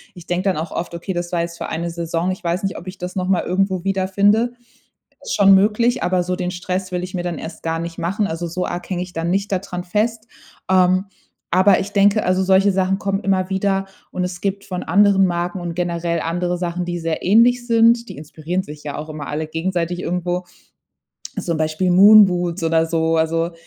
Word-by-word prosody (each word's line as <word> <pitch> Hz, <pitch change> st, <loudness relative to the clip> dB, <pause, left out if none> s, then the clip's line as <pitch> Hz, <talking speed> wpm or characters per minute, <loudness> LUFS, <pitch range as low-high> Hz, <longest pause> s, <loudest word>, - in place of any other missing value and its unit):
Ich 175 Hz, -, -12 dB
denke 180 Hz, +2 st, -2 dB
dann 190 Hz, -4 st, +1 dB
auch 160 Hz, +1 st, -4 dB
oft: 170 Hz, 0 st, -4 dB
„Okay, 175 Hz, +3 st, -4 dB
das 175 Hz, 0 st, -4 dB
war 175 Hz, -, 0 dB
jetzt 170 Hz, 0 st, -5 dB
für -, -, -4 dB
eine 170 Hz, +1 st, -3 dB
Saison, 170 Hz, +1 st, -2 dB
ich 185 Hz, -, -7 dB
weiß 175 Hz, +4 st, -1 dB
nicht, 195 Hz, -1 st, -2 dB
ob 180 Hz, -, -9 dB
ich 185 Hz, -, -7 dB
das 180 Hz, +1 st, -6 dB
noch 185 Hz, -1 st, -2 dB
mal 185 Hz, -2 st, +2 dB
irgendwo 190 Hz, -1 st, 0 dB
wiederfinde.” 200 Hz, +5 st, +2 dB, 0.7 s
Ist -, -, -3 dB
schon 195 Hz, -2 st, +7 dB
möglich, 215 Hz, +5 st, +2 dB
aber 180 Hz, 0 st, +1 dB
so 180 Hz, +1 st, -1 dB
den 180 Hz, -1 st, -3 dB
Stress 185 Hz, +1 st, -4 dB
will 180 Hz, 0 st, -2 dB
ich 185 Hz, +2 st, -9 dB
mir 180 Hz, -, -2 dB
dann 175 Hz, -3 st, -4 dB
erst 160 Hz, +1 st, -8 dB
gar 165 Hz, 0 st, -2 dB
nicht 170 Hz, 0 st, -6 dB
machen, 195 Hz, +5 st, -1 dB
also, 170 Hz, -1 st, -4 dB
so 180 Hz, +2 st, -3 dB
arg 175 Hz, +2 st, -6 dB
hänge 180 Hz, -1 st, -1 dB
ich 180 Hz, 0 st, -8 dB
dann 165 Hz, +1 st, -2 dB
nicht 200 Hz, +2 st, -1 dB
da 190 Hz, -, +2 dB
dran 180 Hz, -2 st, -6 dB
fest. 220 Hz, +5 st, -1 dB, 0.4 s
Ähm, 185 Hz, 0 st, +3 dB, 0.5 s
aber 185 Hz, +2 st, +5 dB
ich 200 Hz, -, -4 dB
denke, 205 Hz, +1 st, +3 dB
also, 185 Hz, +1 st, +2 dB
solche 190 Hz, +1 st, +4 dB
Sachen 190 Hz, 0 st, +1 dB
kommen 195 Hz, -1 st, -1 dB
immer 190 Hz, -2 st, 0 dB
wieder 195 Hz, 0 st, 0 dB, 0.3 s
und 185 Hz, -, -2 dB
es 180 Hz, -1 st, -5 dB
gibt 200 Hz, 0 st, -2 dB
von 180 Hz, -1 st, -5 dB
anderen 195 Hz, +1 st, +4 dB
Marken 175 Hz, +1 st, -2 dB
und 170 Hz, -1 st, -5 dB
generell 170 Hz, -1 st, -1 dB
andere 175 Hz, +2 st, -1 dB
Sachen, 175 Hz, 0 st, -3 dB
die 175 Hz, 0 st, -3 dB
sehr 165 Hz, -1 st, -3 dB
ähnlich 240 Hz, +5 st, +4 dB
sind. 230 Hz, 0 st, +4 dB
Die -, -, -9 dB
inspirieren 160 Hz, +5 st, -4 dB
sich 150 Hz, -2 st, -11 dB
ja 145 Hz, -, -5 dB
auch 155 Hz, +1 st, -6 dB
immer 150 Hz, -2 st, -6 dB
alle 155 Hz, +2 st, -3 dB
gegenseitig 175 Hz, +1 st, -2 dB
irgendwo, 180 Hz, 0 st, -2 dB, 1.0 s
zum 170 Hz, -2 st, -2 dB
Beispiel 155 Hz, +4 st, 0 dB
Moonboots 185 Hz, -3 st, +6 dB
oder 165 Hz, 0 st, +3 dB
so, 165 Hz, 0 st, +1 dB
also, 165 Hz, +1 st, 0 dB
180 Hz, 220 wpm, -20 LUFS, 170-195 Hz, 1.0 s, schon